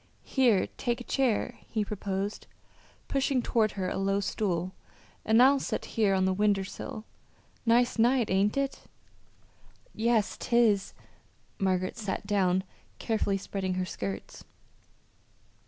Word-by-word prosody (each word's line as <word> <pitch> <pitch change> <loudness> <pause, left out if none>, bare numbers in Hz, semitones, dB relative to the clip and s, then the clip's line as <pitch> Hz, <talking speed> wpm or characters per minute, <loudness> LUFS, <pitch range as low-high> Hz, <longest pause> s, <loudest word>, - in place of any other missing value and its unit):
"Here, 245 -8 +3
take 240 0 -1
a - - -7
chair," 245 -2 0
he 215 -2 -1
proposed, 200 0 -4 0.6
pushing 270 -2 +1
toward 220 -2 +1
her 190 -2 -2
a - - -2
low 195 +1 +1
stool; 185 -3 -1 0.5
"an' 220 +1 +4
I'll 275 +2 +6
set - - -3
here 210 -4 +3
on 190 0 +2
the 190 - +2
winder 200 0 +2
sill. 215 +3 -7 0.6
Nice 240 +1 +3
night; 240 -1 +3
ain't 200 +5 +2
it?" 275 0 -2 1.1
"Yes, 225 -1 +1
'tis." 230 -5 +2 0.6
Margaret 185 0 0
sat 210 -2 -3
down, 190 -2 +2 0.3
carefully 215 -3 0
spreading 190 -1 -3
her 185 0 -1
skirts. 100 - -6
210 Hz, 125 wpm, -29 LUFS, 190-235 Hz, 1.1 s, I'll